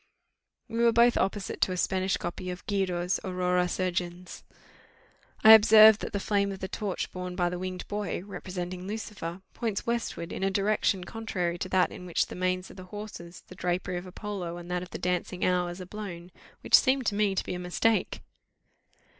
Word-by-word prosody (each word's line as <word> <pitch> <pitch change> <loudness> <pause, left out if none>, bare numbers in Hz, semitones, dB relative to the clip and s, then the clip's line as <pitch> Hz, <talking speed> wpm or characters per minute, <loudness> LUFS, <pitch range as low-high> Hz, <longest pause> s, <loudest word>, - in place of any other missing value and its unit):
We 230 - -4
were 235 - +6
both 235 +1 +5
opposite 195 +1 -1
to - - +3
a 180 - -3
Spanish 190 +1 0
copy 180 +2 -5
of 180 0 -7
Guido's 185 -3 0
Aurora 180 -1 +1
Surgens. 180 -1 -3 1.0
I 220 - +10
observed 220 0 +8
that - - -4
the 200 - -2
flame 200 0 +1
of 195 - -5
the 190 - -5
torch 200 -1 -3
borne 180 -1 -5
by 175 -1 +1
the 180 0 -4
winged 185 0 -5
boy, 205 -4 -3
representing 180 -1 -6
Lucifer, 195 -4 -6
points 220 -4 -3
westward, 235 -7 -3
in - - -5
a 195 - +2
direction 195 -1 +1
contrary 180 -5 -3
to 185 - -4
that 185 -1 +3
in 180 - -9
which 170 - +1
the - - -9
manes 185 0 -1
of - - -14
the 185 - -9
horses, 185 -3 -9
the - - -11
drapery 180 0 -2
of 175 +1 -7
Apollo, 185 -3 -5
and 175 0 -9
that 180 0 0
of 180 - -8
the - - -6
dancing 180 0 -1
Hours, 180 0 0
are 185 - -6
blown, 185 -3 -8 0.3
which - - -10
seemed 265 -1 +6
to 210 - +1
me 205 -2 +2
to - - 0
be - - -3
a 180 - -4
mistake. 195 +5 0
185 Hz, 195 wpm, -28 LUFS, 180-205 Hz, 1.0 s, I